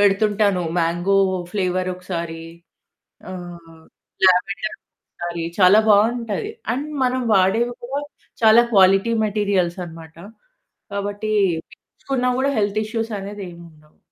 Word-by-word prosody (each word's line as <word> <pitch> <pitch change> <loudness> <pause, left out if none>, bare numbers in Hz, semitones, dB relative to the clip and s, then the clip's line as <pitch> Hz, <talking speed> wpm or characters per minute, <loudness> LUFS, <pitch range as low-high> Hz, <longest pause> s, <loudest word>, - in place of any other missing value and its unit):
పెడుతుంటాను. 205 -1 +2 0.2
Mango 175 +4 +1 0.3
flavour 185 -2 -1
ఒకసారి 170 -3 -5 0.9
ఆహ్, 170 -3 -10 0.5
lavender 195 +4 +1 0.3
ఒకసారి, 170 -1 -6 0.2
చాలా 185 +3 +7
బావుంటది. 230 - +2 0.2
అండ్ 285 +4 -3 0.2
మనం 255 0 0
వాడేవి 210 +6 +2
కూడా 270 +4 -3 0.4
చాలా 220 +1 +7
క్వాలిటీ 195 +3 +5
మెటీరియల్స్ 200 -4 0
అనమాట. 160 -1 -12 0.8
కాబట్టి 205 +2 -3 0.4
పీల్చుకున్నా 250 +1 -4
కూడా 275 +1 +1
హెల్త్ 205 0 +1
ఇష్యూస్ 225 +1 -3
అనేది 200 +1 -7
ఏముండవు. 160 -3 -16
200 Hz, 100 wpm, -21 LUFS, 175-220 Hz, 0.9 s, చాలా